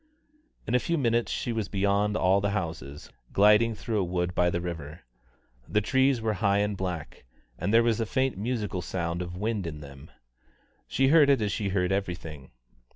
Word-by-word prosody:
In 115 - -3
a 125 - +5
few 170 +6 -1
minutes 120 -4 +1
she 120 - -2
was 110 -3 -3
beyond 100 +1 +1
all 95 +1 +3
the 100 - 0
houses, 80 -5 -6 0.2
gliding 105 +3 +4
through 110 0 -2
a - - +1
wood 90 0 -2
by 90 0 +2
the 85 - -1
river. 80 -3 -6 0.7
The 105 - +2
trees 130 +3 +2
were 110 -1 0
high 100 -2 +3
and 105 0 0
black, 90 -8 -5 0.4
and 100 - -1
there 115 +1 +5
was 115 -1 +1
a 115 - -1
faint 130 +3 0
musical 105 -3 -3
sound 85 0 -3
of 90 0 -6
wind 105 -2 -2
in 75 -2 -6
them. 70 0 -12 0.8
She 135 0 +2
heard 150 -2 +6
it 140 -3 +4
as 105 -2 -1
she 100 -2 -2
heard 90 -1 0
everything. 85 -7 -4
100 Hz, 190 wpm, -27 LUFS, 90-115 Hz, 0.8 s, heard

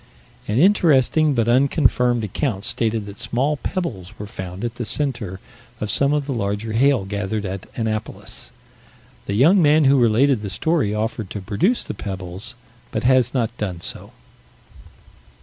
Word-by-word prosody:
"An 105 - -1
interesting, 155 -4 +4
but 115 -2 +1
unconfirmed, 125 -2 +3
account 105 -1 -2
stated 115 -2 -1
that 100 0 -9
small 140 +5 0
pebbles 110 - -4
were 105 - -6
found 95 -1 -7
at 120 -1 -2
the 120 - -5
center 115 -8 -2 0.4
of 105 -1 -2
some 140 +5 +3
of 150 -1 0
the 140 - -2
larger 105 0 -2
hail 130 -2 +3
gathered 100 +1 -3
at 95 0 -5
Annapolis. 110 -2 -4 0.8
The 100 - -1
young 165 - +5
man 155 0 +5
who 135 0 +5
related 120 +2 +3
the 100 - -4
story 150 - 0
offered 110 -1 -3
to 105 - -5
produce 105 - 0
the - - -5
pebbles, 95 +2 -6 0.3
but - - -3
has 130 0 +3
not 120 -2 0
done 95 -5 -3
so." - - -6
115 Hz, 155 wpm, -21 LUFS, 100-135 Hz, 0.8 s, young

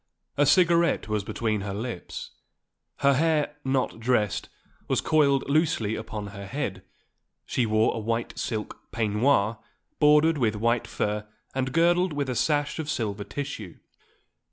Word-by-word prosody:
A 145 0 +3
cigarette 170 -2 +4
was 105 -2 -1
between 110 0 -1
her 100 0 -4
lips; 115 -3 -6 0.7
her 140 0 +5
hair, 150 0 +1
not 130 -3 0
dressed, 115 -4 0 0.4
was - - +1
coiled 140 -3 +3
loosely 150 -7 +1
upon 110 -2 -5
her 100 -1 -8
head; 140 +8 -3 0.6
she 120 - 0
wore 110 +1 +3
a - - -3
white 115 +2 -2
silk 110 -2 -4
peignoir 110 0 +2 0.4
bordered 150 +1 +5
with 110 -4 +1
white 115 +2 +1
fur 105 0 -2 0.3
and 130 0 -1
girdled 175 +3 +3
with 140 -2 -2
a - - -3
sash 145 +6 0
of 155 -2 -3
silver 105 -7 -2
tissue. 115 - -6
125 Hz, 140 wpm, -26 LUFS, 110-150 Hz, 0.7 s, her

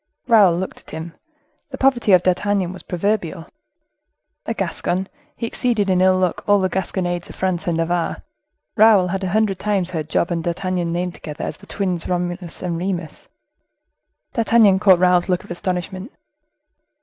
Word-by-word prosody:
Raoul 205 -8 +5
looked 190 +1 -5
at - - -17
him. 160 +1 -7 0.6
The 265 - -7
poverty 265 -6 +2
of 180 -1 +6
D'Artagnan 185 0 0
was 185 - -10
proverbial. 180 -2 -2 1.0
A - - 0
Gascon, 185 +2 -2 0.3
he 230 - -4
exceeded 230 -4 0
in 180 0 +2
ill 185 0 +4
luck 185 -2 -1
all 205 - +5
the 185 -1 +1
gasconnades 175 -1 -2
of - - -10
France 185 0 -2
and 170 -2 +1
Navarre; 165 +1 -1 0.5
Raoul 210 -4 +5
had 195 +2 -2
a 185 - -1
hundred 210 -1 +1
times 195 -4 -1
heard 155 -3 -4
Job 170 - 0
and 170 -1 -1
D'Artagnan 175 0 -2
named 175 +1 -2
together, 150 -3 -8
as - - -5
the 200 - -17
twins 185 -4 -2
Romulus 175 0 -3
and 170 -2 -2
Remus. 180 -3 -4 1.1
D'Artagnan 225 -5 +4
caught 190 -3 +6
Raoul's 180 0 +3
look 180 -1 0
of - - -12
astonishment. 185 - -4
185 Hz, 165 wpm, -20 LUFS, 175-200 Hz, 1.1 s, of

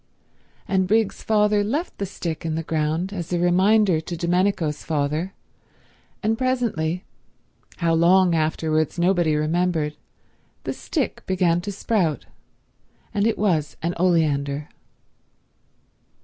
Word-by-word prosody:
And 190 -1 +1
Briggs's 220 +1 +1
father 210 -1 +2
left 285 - -3
the 200 - -2
stick 165 -4 -5
in 160 -1 -2
the 165 - -2
ground 160 +4 -1
as 175 -4 -5
a 175 - +1
reminder 185 +1 +3
to 170 +2 -6
Domenico's 175 -3 0
father, 155 +5 -1 0.9
and 220 +1 +1
presently—how 180 -7 -3
long 175 +2 +4
afterwards 155 0 0
nobody 175 -3 +2
remembered—the 155 0 -3
stick - - -3
began 180 -2 +2
to 205 - -4
sprout, 190 -6 0 0.9
and 205 +1 +2
it 225 - 0
was 165 -8 0
an 170 +1 0
oleander. 150 -5 +1
175 Hz, 110 wpm, -23 LUFS, 160-195 Hz, 0.9 s, long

